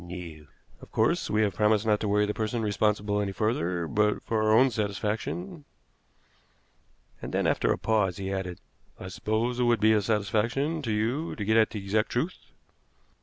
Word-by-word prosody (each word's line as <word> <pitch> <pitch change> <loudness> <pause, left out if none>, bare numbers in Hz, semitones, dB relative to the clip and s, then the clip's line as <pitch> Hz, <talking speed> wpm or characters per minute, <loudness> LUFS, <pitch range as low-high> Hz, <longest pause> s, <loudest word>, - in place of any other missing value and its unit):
"No." 85 -4 -9 0.3
"Of - - -13
course, - - +1
we 110 +1 +2
have 100 -2 0
promised 105 +2 +2
not 105 -1 +2
to 105 - -2
worry 105 +1 +2
the 105 - -2
person 110 +1 -2
responsible 105 0 0
any 100 -1 -2
further, 90 -5 -1
but 105 +4 +1
for 110 -1 -1
our 110 0 +2
own 125 +4 +5
satisfaction 110 - -3 0.8
" - - -39
And - - -6
then, - - 0
after - - +2
a - - +1
pause, 105 -5 0
he 95 0 -3
added: 90 -2 -4 0.4
"I 95 - -7
suppose 110 +5 -1
it - - +2
would 120 -2 +3
be 110 +1 +4
a 105 - +3
satisfaction 115 +9 0
to 115 -6 -3
you 115 +10 -1
to 105 - -4
get 110 +2 +2
at 110 -1 +4
the 105 -3 -6
exact 105 +2 0
truth?" 155 +10 -2
105 Hz, 190 wpm, -27 LUFS, 100-115 Hz, 0.8 s, own